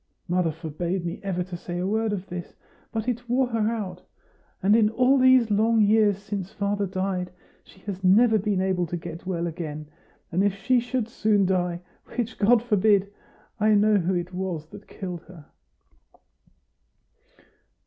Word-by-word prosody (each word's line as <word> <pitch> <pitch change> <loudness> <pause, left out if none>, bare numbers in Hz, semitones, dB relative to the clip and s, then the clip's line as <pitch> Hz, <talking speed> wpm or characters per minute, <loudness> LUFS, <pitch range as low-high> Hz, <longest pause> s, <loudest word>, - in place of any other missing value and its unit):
Mother 175 -2 +1
forbade 170 +3 -4
me 170 - -4
ever 185 -3 -2
to 180 0 -8
say 175 0 -6
a 180 - -2
word 220 +2 0
of 195 -2 -3
this; 180 -2 -7 0.4
but 225 +1 -3
it 245 0 -3
wore 255 +2 +3
her 225 -2 +1
out. 195 -6 -4 0.6
And 205 +3 +5
in 220 -2 +4
all 255 +4 +3
these 255 -3 +5
long 220 +2 +3
years 210 -1 +4
since 200 -2 -5
father 200 0 -1
died, 185 -1 -2 0.3
she 190 - -20
has 195 -1 -6
never 220 +4 +5
been 200 -1 0
able 185 -2 0
to 175 - -3
get 170 +1 -8
well 175 -2 -1
again. 155 -2 -5 0.5
And 185 +4 +1
if 200 -1 +1
she 250 +5 +2
should 245 -1 -2
soon 215 -3 +2
die 180 -2 0 0.3
which 240 -1 -3
God 225 +2 +4
forbid! 205 -3 +2 0.5
I 215 0 +4
know 210 +1 +4
who 185 0 0
it 175 +1 -3
was 180 -4 -3
that 205 +3 -13
killed 180 -4 -6
her." 165 -3 -14
195 Hz, 170 wpm, -25 LUFS, 180-220 Hz, 0.6 s, And